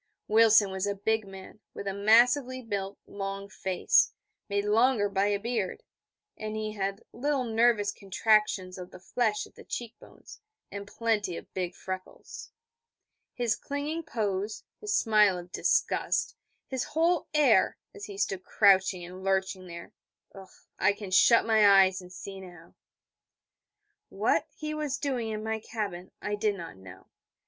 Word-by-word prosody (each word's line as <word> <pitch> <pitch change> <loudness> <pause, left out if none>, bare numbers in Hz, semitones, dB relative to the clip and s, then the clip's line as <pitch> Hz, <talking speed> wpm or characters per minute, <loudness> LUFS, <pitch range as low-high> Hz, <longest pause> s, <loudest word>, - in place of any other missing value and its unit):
Wilson 215 -2 +5
was 190 +1 -2
a 200 - -1
big 220 +1 -1
man, 195 +2 -11 0.2
with - - -6
a 195 - -1
massively 245 +6 +4
built, 200 -4 -4
long 195 0 -5
face, 190 -2 +2 0.4
made 200 0 0
longer 220 0 +3
by 200 0 +1
a 205 -1 +1
beard, 220 -3 -3 0.5
and 215 0 -5
he 215 0 -3
had 195 0 -3
little 280 0 0
nervous 225 -3 +2
contractions 195 -2 +1
of 180 0 -8
the - - -13
flesh 215 +2 -1
at - - -18
the - - -14
cheek 235 -2 -5
bones, - - -15 0.3
and 200 0 -7
plenty 210 -5 -1
of - - -12
big 180 -1 -3
freckles. 185 0 -8 0.9
His 240 -3 0
clinging 290 +3 -4
pose, 210 -8 -3 0.2
his 420 -1 -4
smile 210 -4 +4
of 175 0 -10
disgust, - - 0 0.3
his 260 -2 -3
whole 330 +2 +1
air, 265 -10 +4 0.2
as 205 - -8
he 200 -2 -9
stood 195 -2 -1
crouching 190 -3 +3
and 185 +2 -10
lurching 190 -1 -1
there, 170 -1 -10 0.9
I 195 +2 +4
can 205 -2 -9
shut 230 +5 +6
my 205 -3 +6
eyes, 190 0 -1
and 180 0 -13
see 195 +1 -8
now. 175 -3 -13 1.4
What - - +1
he 305 0 -4
was 300 -3 -2
doing 255 -6 -2
in 215 0 -4
my 220 0 -2
cabin 200 -5 -5
I 205 - -2
did 205 0 0
not 170 - -8
know. 95 -1 -13
205 Hz, 155 wpm, -28 LUFS, 190-225 Hz, 1.4 s, shut